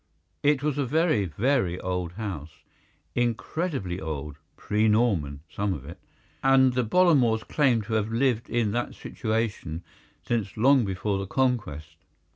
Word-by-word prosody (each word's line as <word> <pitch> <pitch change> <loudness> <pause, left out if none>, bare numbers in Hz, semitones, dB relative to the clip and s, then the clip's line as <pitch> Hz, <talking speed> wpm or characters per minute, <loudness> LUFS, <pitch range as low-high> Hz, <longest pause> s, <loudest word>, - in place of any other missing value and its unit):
It 145 -1 +2
was 145 -1 0
a 140 - +1
very, 155 - +2
very 95 - 0
old 90 -2 -3
house, 90 -7 -5 0.6
incredibly 120 - -2
old—pre 80 +8 -2
Norman, 100 - +1
some 100 -1 -2
of 70 -3 -9
it—and 130 - 0
the 125 0 +1
Bollamores 125 -6 +3
claimed 130 -7 +2
to 110 +1 -5
have 110 0 0
lived 120 -1 +1
in 115 -3 +1
that 120 +2 -2
situation 110 -8 -3 0.4
since 110 -4 -2
long 130 +1 +5
before 95 +1 -1
the 95 - -4
Conquest. 85 - -1
110 Hz, 130 wpm, -26 LUFS, 90-130 Hz, 0.6 s, long